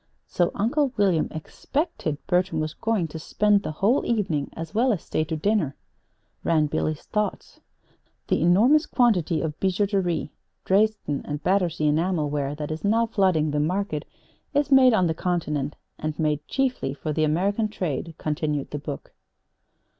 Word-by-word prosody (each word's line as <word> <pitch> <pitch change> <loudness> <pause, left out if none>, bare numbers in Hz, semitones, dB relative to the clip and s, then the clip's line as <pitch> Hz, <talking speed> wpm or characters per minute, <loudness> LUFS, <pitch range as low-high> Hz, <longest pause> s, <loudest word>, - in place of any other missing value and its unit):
"So 175 -1 +1
Uncle 265 +7 +1
William 190 -6 +3
expected 160 - -3
Bertram 180 -3 +1
was 155 0 -2
going 225 -7 0
to 160 - -7
spend 205 +5 +2
the - - -4
whole 210 - +2
evening 180 -11 0
as 165 +1 -7
well 245 +4 +3
as 200 - -2
stay 155 - -1
to 160 +1 -3
dinner!" 170 -5 0 0.7
ran 160 -2 +3
Billy's 150 +1 -2
thoughts. 210 -2 -3 0.7
"'The - - +1
enormous 230 - +4
quantity 185 - +2
of 155 -2 -4
bijouterie, 190 -4 0 0.3
Dresden 205 -7 +1
and 145 0 -5
Battersea 180 -5 +1
enamel 155 -1 0
ware 145 -1 -2
that 150 0 -5
is 155 - -5
now 225 +3 +3
flooding 185 -9 +2
the 150 - 0
market, 165 0 -1 0.5
is 290 0 +1
made 260 -3 +7
on 185 - +3
the 160 - +1
Continent 150 -5 -2 0.2
and 155 -1 -3
made 150 -2 -1
chiefly 255 - -1
for 155 +1 -3
the 155 - +1
American 195 +8 +1
trade,'" 165 -6 -4
continued 150 -2 -2
the 145 - -3
book. 145 -1 -7
175 Hz, 155 wpm, -25 LUFS, 155-210 Hz, 0.7 s, made